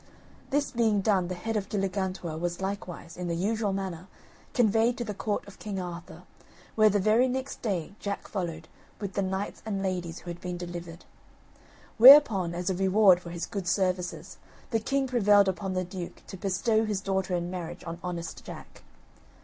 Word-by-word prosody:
This 285 Hz, 0 st, 0 dB
being 225 Hz, -5 st, +2 dB
done, 190 Hz, -3 st, +2 dB
the 185 Hz, -, -4 dB
head 225 Hz, +6 st, -4 dB
of 205 Hz, -2 st, -2 dB
Galligantua 190 Hz, -4 st, -2 dB
was 175 Hz, 0 st, -2 dB
likewise, 190 Hz, -4 st, -5 dB
in 180 Hz, 0 st, -4 dB
the 170 Hz, -, -1 dB
usual 210 Hz, +3 st, 0 dB
manner, 190 Hz, -2 st, -4 dB, 0.4 s
conveyed 230 Hz, 0 st, +3 dB
to 240 Hz, -, -2 dB
the 215 Hz, -3 st, -4 dB
Court 205 Hz, +1 st, -3 dB
of 200 Hz, -, -13 dB
King 200 Hz, -3 st, -4 dB
Arthur, 175 Hz, 0 st, -7 dB, 0.5 s
where, 215 Hz, -1 st, +5 dB
the 205 Hz, -, +2 dB
very 215 Hz, +6 st, +4 dB
next 260 Hz, +2 st, -4 dB
day, 195 Hz, -6 st, -2 dB
Jack 200 Hz, -1 st, -4 dB
followed, 165 Hz, -5 st, -4 dB, 0.3 s
with 200 Hz, -2 st, -5 dB
the 200 Hz, -, 0 dB
knights 190 Hz, +1 st, -3 dB
and 200 Hz, -3 st, -3 dB
ladies 180 Hz, -3 st, -2 dB
who 175 Hz, -, -7 dB
had 170 Hz, -, -9 dB
been 180 Hz, -1 st, -4 dB
delivered. 175 Hz, -1 st, -7 dB, 0.9 s
Whereupon, 225 Hz, -, +8 dB
as 180 Hz, +2 st, -1 dB
a -, -, -1 dB
reward 190 Hz, 0 st, +5 dB
for 170 Hz, -, -9 dB
his 170 Hz, 0 st, -4 dB
good 195 Hz, -4 st, -5 dB
services, 185 Hz, -1 st, -1 dB, 0.3 s
the 225 Hz, -, +2 dB
king 275 Hz, +4 st, 0 dB
prevailed 210 Hz, -5 st, +4 dB
upon 190 Hz, +1 st, -2 dB
the 185 Hz, 0 st, 0 dB
duke 180 Hz, -1 st, -8 dB
to -, -, -9 dB
bestow 200 Hz, +4 st, +1 dB
his 210 Hz, -3 st, -1 dB
daughter 190 Hz, -2 st, -1 dB
in 175 Hz, 0 st, -2 dB
marriage 175 Hz, -1 st, -6 dB
on 170 Hz, 0 st, -6 dB
honest 170 Hz, -2 st, -5 dB
Jack. -, -, -11 dB
190 Hz, 180 wpm, -28 LUFS, 175-210 Hz, 0.9 s, Whereupon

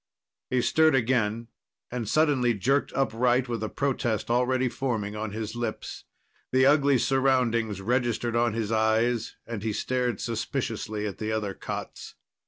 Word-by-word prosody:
He 125 Hz, -1 st, +1 dB
stirred 160 Hz, -2 st, +4 dB
again, 115 Hz, -2 st, 0 dB, 0.4 s
and 120 Hz, -4 st, -3 dB
suddenly 140 Hz, -7 st, +3 dB
jerked 135 Hz, +8 st, +1 dB
upright 125 Hz, 0 st, +1 dB
with 115 Hz, -3 st, -3 dB
a 110 Hz, -, -2 dB
protest 120 Hz, -5 st, -1 dB
already 125 Hz, +1 st, +2 dB
forming 115 Hz, -5 st, -2 dB
on 110 Hz, 0 st, -3 dB
his 110 Hz, +1 st, -5 dB
lips. 120 Hz, -2 st, -5 dB, 0.5 s
The 130 Hz, 0 st, +4 dB
ugly 140 Hz, -1 st, +4 dB
surroundings 125 Hz, -6 st, +1 dB
registered 120 Hz, +1 st, 0 dB
on 120 Hz, -1 st, +2 dB
his 110 Hz, -1 st, -2 dB
eyes, 110 Hz, +1 st, +1 dB
and 115 Hz, -3 st, -5 dB
he 110 Hz, 0 st, -2 dB
stared 125 Hz, +1 st, -1 dB
suspiciously 115 Hz, -2 st, -3 dB
at 100 Hz, -, -5 dB
the 110 Hz, 0 st, -2 dB
other 105 Hz, -3 st, -2 dB
cots. -, -, -7 dB
120 Hz, 145 wpm, -27 LUFS, 110-130 Hz, 0.5 s, stirred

